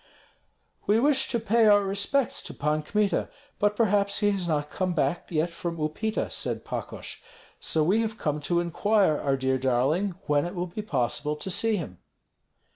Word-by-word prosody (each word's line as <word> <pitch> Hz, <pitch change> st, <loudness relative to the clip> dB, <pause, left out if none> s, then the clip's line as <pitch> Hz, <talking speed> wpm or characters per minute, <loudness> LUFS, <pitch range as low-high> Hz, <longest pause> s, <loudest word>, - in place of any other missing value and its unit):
"We 210 Hz, +2 st, +4 dB
wish 270 Hz, +1 st, +2 dB
to 235 Hz, -, 0 dB
pay 225 Hz, +1 st, +3 dB
our 205 Hz, -1 st, +6 dB
respects 200 Hz, +7 st, 0 dB
to -, -, -8 dB
Pan 150 Hz, +1 st, 0 dB
Kmita, 205 Hz, +5 st, 0 dB, 0.3 s
but 205 Hz, 0 st, +2 dB
perhaps 200 Hz, -2 st, +2 dB
he 205 Hz, 0 st, +4 dB
has 190 Hz, -3 st, -2 dB
not 150 Hz, -2 st, -1 dB
come 185 Hz, -2 st, -1 dB
back 150 Hz, +2 st, 0 dB
yet 165 Hz, +1 st, 0 dB
from 170 Hz, 0 st, -5 dB
Upita," 185 Hz, +9 st, -2 dB
said -, -, -3 dB
Pakosh; -, -, -6 dB, 0.4 s
"so 155 Hz, -, +1 dB
we 195 Hz, +8 st, +3 dB
have 220 Hz, 0 st, -3 dB
come 150 Hz, -6 st, -1 dB
to 170 Hz, +4 st, 0 dB
inquire, 190 Hz, -1 st, +2 dB
our 135 Hz, -1 st, 0 dB
dear 130 Hz, 0 st, 0 dB
darling, 135 Hz, +10 st, +1 dB
when 145 Hz, -3 st, +2 dB
it 175 Hz, -, -7 dB
will 175 Hz, 0 st, -1 dB
be 180 Hz, +4 st, -6 dB
possible 150 Hz, -, -1 dB
to 190 Hz, +5 st, -6 dB
see 220 Hz, +3 st, +2 dB
him." 145 Hz, -, -6 dB
180 Hz, 180 wpm, -27 LUFS, 150-210 Hz, 0.4 s, our